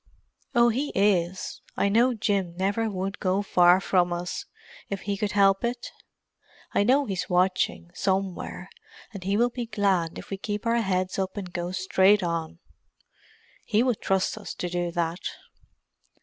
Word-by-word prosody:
"Oh, 240 0 +6
he 265 +6 -1
is. 190 -2 +1 0.2
I - - +2
know 235 +5 +3
Jim 195 -5 -1
never 205 +4 0
would 195 0 -4
go 195 +1 +1
far 180 -1 +5
from 180 -2 +2
us, 175 +1 -4 0.4
if 200 -1 -3
he 200 0 -2
could 205 +1 -2
help 195 0 +4
it. 240 +1 -3 0.8
I - - +3
know 270 +6 +3
he's 190 -6 -3
watching, 180 - +1
somewhere, 190 -1 -2 0.4
and 195 -3 -7
he 195 +2 0
will 240 +2 +3
be 240 -1 -4
glad 195 -6 0
if - - -10
we 195 - -2
keep 205 +3 -4
our 230 0 +2
heads 185 -2 -1
up 190 +1 -2
and 185 -3 -6
go 175 0 -3
straight 190 +2 +3
on. 170 -1 -3 1.1
He 220 +1 +2
would 250 -4 0
trust 190 -1 0
us - - -7
to 180 - -3
do 175 0 -1
that." 170 +1 -1
195 Hz, 165 wpm, -26 LUFS, 180-210 Hz, 1.1 s, Oh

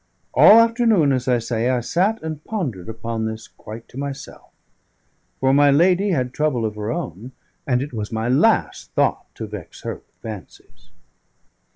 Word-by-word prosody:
All 220 - +8
afternoon, 230 - +3
as 130 -1 -1
I 125 -1 +3
say, 115 +1 -1
I 130 -1 +2
sat 190 - 0
and 155 -1 -5
pondered 130 - -4
upon 115 0 -3
this 110 0 -6
quite 110 +2 -11
to 130 - -9
myself; 140 -1 -7 0.9
for 135 0 +3
my 145 +1 +5
lady 180 +7 +4
had 130 -8 0
trouble 140 -6 0
of 110 - -2
her 105 +1 -4
own, 110 +6 -5 0.3
and 125 -1 +1
it 145 - -8
was 105 -2 -4
my 110 +1 -2
last 130 +3 +2
thought - - +1
to - - -5
vex - - -9
her - - -3
with - - -16
fancies. 90 -5 -10
130 Hz, 170 wpm, -21 LUFS, 110-155 Hz, 0.9 s, All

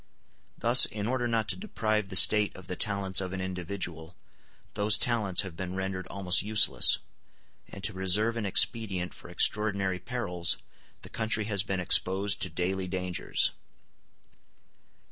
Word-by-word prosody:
Thus, 120 +2 +6
in 105 -1 -6
order 120 +1 -2
not 115 -2 -2
to - - +1
deprive 110 - -3
the 95 - -6
State 105 +1 +5
of 95 - -13
the 90 - -6
talents 100 -1 0
of 95 -1 -6
an 95 - -5
individual, 90 -2 -7 0.6
those 105 +1 +3
talents 105 -7 +1
have 95 -4 -9
been 90 +1 -6
rendered 95 -1 -5
almost 95 -2 0
useless; 110 +1 +4 0.7
and 100 - -12
to 105 - -1
reserve 95 +5 +1
an 110 -3 -3
expedient 95 -2 +1
for - - -14
extraordinary 100 -3 0
perils, 90 -9 0 0.4
the - - -9
country 110 -1 -1
has 100 -3 +3
been 95 -2 -4
exposed 95 +2 +3
to 90 - -1
daily 95 +1 -3
dangers. 90 -1 -2
95 Hz, 145 wpm, -27 LUFS, 95-110 Hz, 0.7 s, Thus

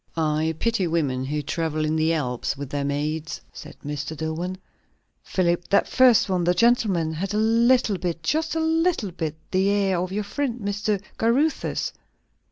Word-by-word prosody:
"I 160 0 +1
pity 230 -4 0
women 140 -6 0
who 150 +2 -2
travel 155 0 -1
in 155 +1 0
the 160 +1 +2
Alps 130 -4 -1
with 140 -1 -6
their 145 -1 -1
maids!" 150 +3 -2
said - - -10
Mr. 145 +1 -4
Dillwyn. 165 +4 -3 0.6
"Philip, 175 -1 0
that 200 - +3
first 255 -5 +5
one, 185 -2 0
the 175 +1 +2
gentleman, 195 -7 +2
had 195 +5 -3
a - - +1
little 230 -1 +3
bit 170 -2 -3
just 315 - 0
a - - +1
little 320 - +1
bit 160 -3 -4 0.2
the 190 +1 +2
air 195 -3 +2
of 180 +1 -3
your 210 +2 -1
friend, 250 +3 -3
Mr. 205 0 -1 0.2
Caruthers. 265 +8 +1
180 Hz, 170 wpm, -24 LUFS, 155-220 Hz, 0.6 s, first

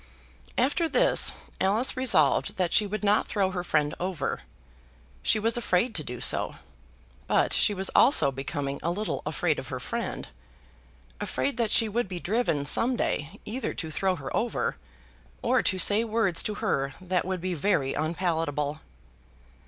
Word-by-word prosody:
After 290 +6 +1
this - - +5 0.3
Alice 215 +9 +2
resolved 190 - +2
that 180 -3 0
she 210 - +3
would 215 +1 -4
not 205 +1 +2
throw 195 -3 0
her 180 -1 -3
friend 150 -4 0
over. 175 -6 -3 0.8
She - - +2
was 225 +2 +1
afraid 225 +1 +1
to - - -1
do - - -7
so. - - +2 0.7
But - - +2
she 205 - +3
was 190 0 0
also 260 - +5
becoming 140 +1 -4
a 165 - -1
little 205 +5 -2
afraid - - 0
of - - -8
her - - -5
friend, - - -4 0.9
afraid 130 - -2
that 230 -3 0
she 225 - +4
would 230 +1 -1
be 180 -1 -5
driven 180 -8 0
some 240 - +2
day 155 -9 -2
either 250 +5 -4
to 160 -2 -5
throw 190 +2 0
her 140 -5 -6
over, 235 - -1 0.7
or 255 +2 +3
to 190 - 0
say 205 +5 +4
words 220 -6 +1
to 210 - -3
her 140 -11 -1
that 185 -1 -1
would 185 0 -3
be 185 +1 -3
very 150 -5 0
unpalatable. 155 -2 -1
185 Hz, 160 wpm, -27 LUFS, 155-220 Hz, 0.9 s, this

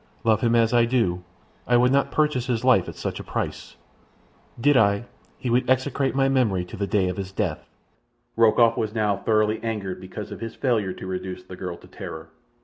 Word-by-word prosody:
Love 110 -1 +3
him 120 -1 +2
as 115 0 +3
I 120 -1 +5
do, 115 -8 0 0.5
I 120 - +4
would 125 +1 +4
not 140 +1 +2
purchase 150 -5 0
his 120 -2 -1
life 120 -9 +4
at - - -9
such - - -4
a - - -6
price. - - -4 0.8
Did 145 +4 +4
I, 100 -1 +3 0.3
he 130 - -5
would 125 +1 +2
execrate 135 +1 +1
my 135 0 +3
memory 115 -9 +1
to - - -9
the 100 0 -2
day 95 -2 +1
of 90 - -3
his 95 -1 -5
death." 95 -6 -3 0.7
Rokoff 115 0 +4
was 110 -1 -2
now 105 -2 +1
thoroughly 110 +1 +1
angered 105 -5 -3
because 100 +3 -8
of - - -7
his 115 -1 -6
failure 110 -8 0
to - - -9
reduce 95 0 -5
the 95 - -10
girl 90 -2 -6
to - - -17
terror. - - -8
110 Hz, 205 wpm, -24 LUFS, 95-125 Hz, 0.8 s, I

